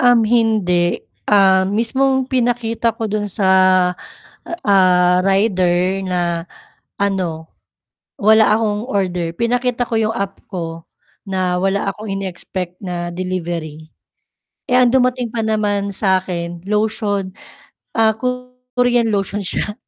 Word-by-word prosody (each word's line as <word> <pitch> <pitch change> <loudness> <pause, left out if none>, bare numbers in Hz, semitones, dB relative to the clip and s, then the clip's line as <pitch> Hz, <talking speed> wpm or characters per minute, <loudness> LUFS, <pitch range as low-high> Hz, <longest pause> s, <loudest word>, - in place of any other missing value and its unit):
Uhm, 245 -3 +5
hindi, 215 -7 +2 0.3
ah, 190 -2 +4
mismong 265 +5 +1
pinakita 235 -2 0
ko 225 - -3
dun 210 -1 -2
sa, 190 0 0 1.2
ah, 180 -2 +4
rider, 190 -1 +1
na 175 -2 -1 0.5
ano, 180 -5 -2 0.7
wala 220 +1 +5
akong 215 +1 -2
order 180 -4 -1
pinakita 245 +1 0
ko 230 - -4
yung 220 0 +1
app 200 -2 -4
ko 165 -3 -5 0.5
na 185 -1 0
wala 195 +1 0
akong 210 +2 -9
ine-expect 180 -1 -5
na 175 -2 -4
delivery. 170 -4 -5 0.8
Eh, 250 - +4
ang 250 - +5
dumating 250 -1 +1
pa 225 - -1
naman 205 -2 0
sa 190 -2 +1
akin 170 -2 -5
lotion, 210 -2 -1 0.6
ah, 220 -1 +4
Korean 250 -1 -1
lotion 200 0 -1
siya, 205 +2 -2
200 Hz, 115 wpm, -18 LUFS, 180-225 Hz, 1.2 s, Uhm